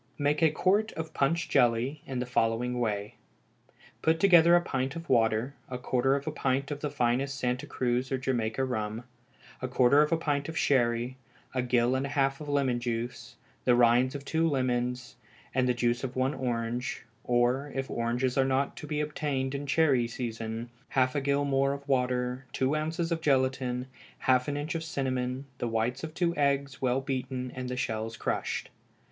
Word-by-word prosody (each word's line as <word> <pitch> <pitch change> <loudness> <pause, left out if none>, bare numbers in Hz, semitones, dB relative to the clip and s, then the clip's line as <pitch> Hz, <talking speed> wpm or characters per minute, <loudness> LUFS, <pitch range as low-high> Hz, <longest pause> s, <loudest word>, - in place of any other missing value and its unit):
Make 145 +1 +1
a 160 - +6
quart 200 +8 +2
of 160 0 -6
punch 165 +5 +1
jelly 120 +5 +2
in 130 - -4
the 125 - -1
following 125 +1 0
way: 105 -3 -2 0.8
Put 160 0 +2
together 175 -2 +7
a 175 - +5
pint 135 -3 -2
of 165 0 -7
water, 115 0 +2 0.2
a 125 - -3
quarter 130 +2 +1
of 140 0 -3
a 155 - -2
pint 140 -1 -1
of 145 - -3
the 150 - -2
finest 135 0 0
Santa 130 +2 -1
Cruz 125 -1 -1
or 135 - +1
Jamaica 125 -1 -1
rum, 110 -2 -3 0.6
a 130 - -1
quarter 130 +3 +5
of 150 - +2
a 165 - +3
pint 145 -2 -1
of 160 - -5
sherry, 120 -1 +1 0.4
a 130 - +1
gill 120 0 +2
and 130 +1 0
a 140 - -7
half 135 +1 +2
of 150 - -6
lemon 135 -4 +1
juice, 120 +1 -4 0.3
the 125 - +4
rinds 120 +2 +4
of 140 0 -6
two 165 +2 +1
lemons, 125 -2 -1 0.4
and 130 0 +2
the - - +4
juice 120 +1 0
of 130 -1 -4
one 130 +2 +1
orange, 120 -2 -3 0.2
or, 125 +4 +1
if 135 0 -2
oranges 120 +3 -1
are - - +5
not 135 +1 0
to 150 - -7
be 150 0 -1
obtained 145 -3 -2
in 140 +1 -4
cherry 140 -6 +3
season, 115 -1 -5 0.2
half 130 -1 +2
a 145 - 0
gill 140 +1 +1
more 135 0 +2
of 140 0 -8
water, 125 -1 0
two 135 +3 +1
ounces 160 +2 -2
of 165 -1 0
gelatine, 130 -3 +1 0.3
half 130 -1 +2
an 145 0 -1
inch 145 +2 -3
of 165 -1 -3
cinnamon, 130 -3 -2
the 120 - -1
whites 115 +4 -1
of 160 0 -6
two 170 -1 +1
eggs 140 -2 0
well 130 0 +1
beaten 130 -2 -3
and 130 -1 -5
the 125 - -3
shells 115 -2 -3
crushed. - - -2
130 Hz, 190 wpm, -29 LUFS, 125-145 Hz, 0.8 s, together